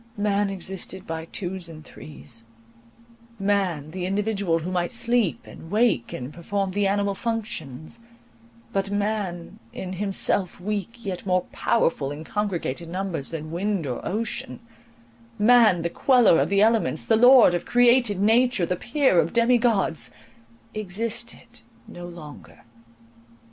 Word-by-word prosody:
Man 205 -1 +1
existed 190 0 -5
by 160 0 -5
twos 180 0 -4
and 155 -1 -11
threes; 75 - -11 0.9
man, 195 -7 0
the 180 +1 -4
individual 200 -3 0
who 165 +3 -4
might 175 -1 -1
sleep, 235 -6 +1
and 165 - -12
wake, 210 - +1
and 125 +4 -6
perform 195 +3 -2
the 200 +1 +1
animal 200 0 0
functions; 205 - -5 0.7
but 195 0 -1
man, 200 -4 -3
in 185 0 -6
himself 195 -1 0
weak, 210 +4 -4
yet 185 -2 -4
more 180 -1 +2
powerful 165 -11 0
in 145 +2 -7
congregated 170 -5 -3
numbers 180 -5 -3
than 155 -1 -6
wind 190 0 -1
or 125 -3 -4
ocean; 230 +5 -3 0.8
man, 215 -6 +5
the 170 - 0
queller 245 -10 +4
of - - 0
the 200 +1 +4
elements, 225 0 +1
the 225 - +3
lord 245 -3 +7
of 175 - -2
created 245 -4 +4
nature, 225 -1 +3
the 180 - -1
peer 240 - +2
of 165 0 0
demi 235 +1 +4
gods, 190 - +1 0.6
existed 215 +3 -5 0.3
no 175 0 -9
longer. 155 -8 -12
195 Hz, 135 wpm, -24 LUFS, 170-215 Hz, 0.9 s, lord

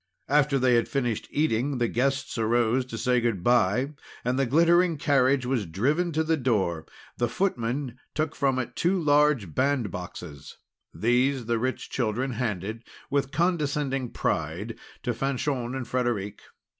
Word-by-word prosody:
After 145 0 +3
they 130 -1 +3
had 120 -1 +2
finished 120 -6 -1
eating, 140 -2 0
the 120 -1 +1
guests 135 +4 -1
arose 120 +2 +2
to 115 - -6
say 125 +1 +2
good 115 -7 -1
bye, 120 +3 +3 0.3
and 125 +2 +1
the 135 - +2
glittering 170 +4 +4
carriage 135 -3 +2
was 125 -6 -1
driven 145 - 0
to 160 +1 +1
the 160 0 +1
door. 95 - 0 0.3
The 120 -1 0
footman 125 -5 -2 0.2
took 155 0 -1
from 135 -2 +1
it 130 -2 -3
two 185 +2 +1
large 145 - +3
bandboxes. 90 - -3 0.4
These, 125 +3 +1
the 115 0 0
rich 130 +2 -3
children 125 +2 -1
handed 110 -2 -3 0.3
with 140 -1 +1
condescending 145 -6 0
pride, 85 +8 -2 0.3
to 120 - 0
Fanchon 130 0 -2
and 130 -3 -4
Frederic. 120 -5 -2
125 Hz, 145 wpm, -26 LUFS, 115-140 Hz, 0.4 s, glittering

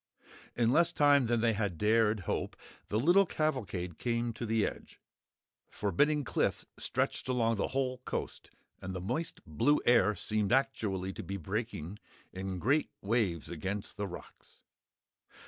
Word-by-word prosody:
In 120 -1 +3
less 170 +5 +4
time 145 -3 +4
than 120 -1 +1
they 115 -1 +3
had 100 -5 -2
dared 110 0 +3
hope, - - -2 0.3
the 105 - -1
little 180 +9 +5
cavalcade 100 - -2
came 120 -1 -1
to 115 +1 -5
the 110 -1 +2
edge. - - -7 0.7
Forbidding 145 +8 +1
cliffs - - 0
stretched - - -1
along 115 -3 +2
the 100 - 0
whole 130 -1 -1
coast 125 - -5 0.3
and 95 0 -5
the - - -3
moist, 155 - -3
blue 120 - +2
air 110 -4 +5
seemed 105 -1 -1
actually 105 -8 0
to - - -6
be 95 +3 -5
breaking 85 +2 -4 0.3
in 95 0 -4
great 140 - +2
waves 100 -7 0
against 95 +5 -4
the 100 -1 -2
rocks. 90 - -12
110 Hz, 145 wpm, -32 LUFS, 95-130 Hz, 0.7 s, little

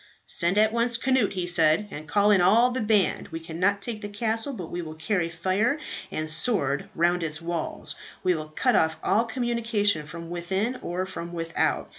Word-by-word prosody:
"Send 175 +3 +1
at 215 +1 +4
once, 235 0 +1
Cnut," 255 -3 +1
he 180 -2 -2
said, 170 +2 +3
"and 155 +1 -8
call 205 +5 +3
in 195 -3 +5
all 225 +7 +5
the 255 0 -2
band. 210 -3 +2
We 165 - -6
cannot 185 +5 -1
take 225 -3 -4
the 205 - -5
castle; 225 +4 -1
but 185 -11 -7
we 175 - -3
will 155 -2 -8
carry 170 +1 -1
fire 190 - 0 0.3
and 155 0 -3
sword 155 - +1
round 175 +1 +2
its 155 -2 -2
walls. 170 -1 -4 0.3
We 185 -1 +3
will 155 -2 -4
cut 155 - +1
off 160 -1 +2
all 215 +5 +2
communication 225 - 0
from 170 +2 -8
within 190 +8 -2
or 180 +2 -3
from 175 -2 -7
without. 165 -1 -1
185 Hz, 190 wpm, -26 LUFS, 165-220 Hz, 0.3 s, in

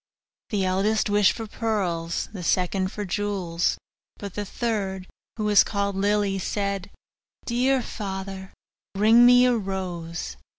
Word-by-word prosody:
The 200 -3 0
eldest 205 +3 +1
wished 205 -2 +4
for 225 - -6
pearls; 185 -7 -2
the 195 - -6
second 185 +2 0
for 210 - -5
jewels; 185 -3 -1 0.4
but 200 -3 -7
the 205 - -4
third, 200 -4 -3 0.3
who 215 - -2
was 210 -1 +6
called 200 -1 -2
Lily, 200 0 +1
said, 200 0 -2 0.6
'Dear 255 +2 +1
father, 190 -2 -6 0.4
bring 225 +4 +6
me 245 0 +7
a 250 -1 +3
rose. 175 - -4
200 Hz, 130 wpm, -25 LUFS, 190-215 Hz, 0.6 s, me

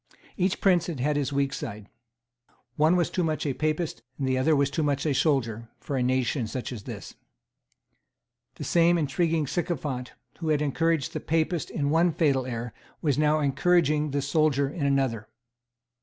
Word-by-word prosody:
Each 185 0 0
prince 180 -3 +3
had 165 -6 -4
had 145 +4 +1
his 145 -2 -1
weak 140 0 0
side. 105 -4 -6 0.9
One 155 +4 +4
was 175 -2 +1
too 180 - 0
much 155 -1 -1
a 140 - 0
Papist, 155 -2 -2 0.2
and 135 - -2
the 130 - +1
other 140 +2 +3
too 145 +4 -2
much 145 -1 0
a 150 - +2
soldier, 115 -6 0
for 140 - -4
such 130 - +1
a 125 - +2
nation 130 +1 0
as 125 -4 -5
this. - - -8 1.4
The - - -7
same 170 0 +3
intriguing 160 +1 +1
sycophant 140 -5 -3 0.3
who 165 -2 -2
had 150 -1 +2
encouraged 160 +1 0
the - - -2
Papist 160 +1 -1
in 145 -2 -1
one 165 +1 +3
fatal 135 -6 +1
error 120 -2 -4 0.3
was 145 -2 +1
now 155 0 +3
encouraging 150 +1 +2
the 140 0 -1
soldier 145 -1 +2
in 145 0 -2
another. 135 -6 0
145 Hz, 170 wpm, -27 LUFS, 135-160 Hz, 1.4 s, One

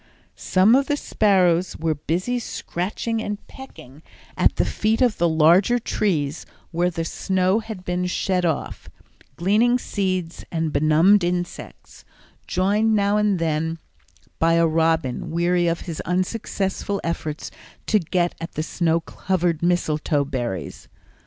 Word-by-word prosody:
Some 190 +4 +3
of 275 +2 +3
the 290 - 0
sparrows 185 -8 +2
were 160 0 0
busy 175 - -2
scratching 220 +2 -3
and 210 -1 -3
pecking 150 - -13 0.3
at - - +3
the - - +1
feet 220 +1 0
of 245 -5 +2
the 170 0 +3
larger 170 +9 +4
trees 165 -10 -1 0.3
where 175 +1 +1
the 165 -2 -4
snow 190 +3 0
had 220 -5 -8
been 180 0 -1
shed 180 0 0
off, 160 -4 -3 0.5
gleaning 215 - +3
seeds 185 -7 -3
and 160 -2 -2
benumbed 160 +7 +4
insects, 175 0 -5 0.4
joined 210 +4 +2
now 205 0 +2
and 210 -2 +2
then 160 0 -1 0.6
by 165 0 +3
a 170 0 +4
robin 160 -4 0
weary 175 +1 +1
of 170 0 -1
his 165 -4 -5
unsuccessful 195 +1 -2
efforts 160 -2 -4 0.3
to 215 - +3
get 175 0 0
at 165 - -6
the 155 - -2
snow 165 0 0
covered 175 -2 -1
mistletoe 155 -4 +1
berries. 120 -9 -5
180 Hz, 135 wpm, -22 LUFS, 165-200 Hz, 0.6 s, larger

